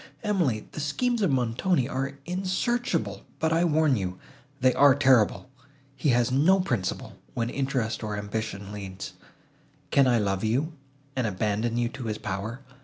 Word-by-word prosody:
Emily! 170 - 0
the - - -7
schemes 235 - 0
of 195 - +3
Montoni 130 +4 +1
are 135 0 -3
insearchable, 190 +7 -1 0.2
but, 160 0 +1
I 165 +1 +3
warn 155 -4 +3
you, 90 -4 -3 0.4
they 130 -1 +4
are 140 -2 +6
terrible; 130 -5 +3 0.5
he 135 +2 0
has 120 0 +3
no 160 +9 +4
principle, 120 - -2 0.2
when 120 -1 -1
interest, 130 -5 -1
or 105 -1 -3
ambition 105 -1 -4
leads. 100 -2 -7 0.8
Can 140 -2 +5
I 120 -2 +4
love 100 -2 0
you, 135 +9 0 0.4
and 130 -3 0
abandon 105 +4 -1
you 120 0 +2
to 130 -1 -7
his 110 -1 -2
power? 110 +6 -4
130 Hz, 155 wpm, -27 LUFS, 110-150 Hz, 0.8 s, are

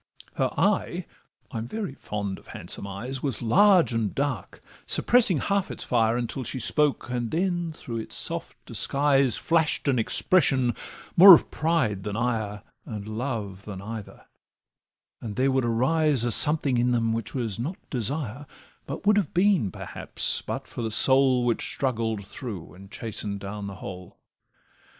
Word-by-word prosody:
Her - - 0
eye - - 0 0.5
(I'm 115 0 -4
very 205 - -4
fond 100 -6 -5
of - - -22
handsome 100 - -5
eyes) 120 +7 -5
Was 135 -5 -2
large 185 - +4
and 115 -3 -1
dark, 135 -9 -3 0.2
suppressing 230 -8 +3
half 200 +6 -1
its - - -4
fire 115 -1 +1
Until 125 +2 -3
she 130 - -4
spoke, 150 +2 +1
then 165 +8 -1
through 120 -7 -7
its 110 - -6
soft - - -2
disguise 140 -4 +2
Flash'd 160 -3 0
an 130 -3 +2
expression 130 -1 +2 0.4
more 185 +1 +11
of - - -2
pride 155 - 0
than 105 +1 -5
ire, 110 -3 -2 0.2
And 105 -2 -7
love 110 -4 -4
than 100 -3 -7
either; 110 +1 -8 1.0
and 110 -3 -6
there 135 +2 +2
would 130 -2 +1
arise 130 +3 +2
A 120 - 0
something 140 0 +4
in 125 +1 +2
them 115 -1 +1
which 115 +3 -4
was 115 -5 -3
not 155 +10 -4
desire, 130 +2 -3 0.4
But 140 +8 -6
would 210 0 +4
have 190 -6 -1
been, 180 - +3
perhaps, - - -2
but - - -5
for - - -7
the 115 - -2
soul 130 +2 +5
Which 120 -1 0
struggled 115 -6 -2
through 100 -4 -8
and 95 +2 -14
chasten'd 105 -2 -3
down 100 +1 -6
the 100 - -7
whole. 90 -1 -9
120 Hz, 155 wpm, -26 LUFS, 110-145 Hz, 1.0 s, more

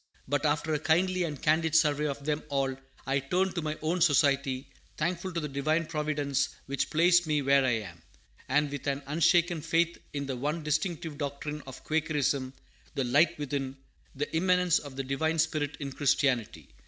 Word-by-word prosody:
But 145 +3 +1
after 150 +2 0
a 150 - +1
kindly 180 +4 +2
and 150 -4 -5
candid 160 +1 +2
survey 150 -1 +3
of 140 -1 -5
them 150 0 0
all, 135 -1 0 0.3
I 135 +1 +1
turn 180 +8 0
to 170 - -2
my 155 0 -3
own 170 +3 0
Society, 140 -3 +3 0.3
thankful 175 +3 -2
to 170 - -2
the 150 - -3
Divine 155 +4 0
Providence 150 -3 -1 0.2
which 140 0 -2
placed 175 +1 +4
me 150 -2 +1
where 140 0 +4
I 120 -4 +1
am; 85 -4 -11 0.5
and 145 +2 +2
with 145 0 -5
an 140 0 -1
unshaken 170 +2 +2
faith 165 +2 +1
in 140 -1 -3
the 135 -1 -3
one 150 +6 -2
distinctive 155 0 -2
doctrine 150 +1 -4
of 130 - -10
Quakerism 145 -4 0 0.4
the 135 - 0
Light 150 +7 +3
within 140 -2 -3 0.4
the 145 +3 -3
immanence 180 0 +3
of 140 -3 -10
the 135 - -3
Divine 155 +5 -1
Spirit 145 -2 0
in 140 -2 -4
Christianity. 130 -4 0
150 Hz, 180 wpm, -29 LUFS, 140-160 Hz, 0.5 s, placed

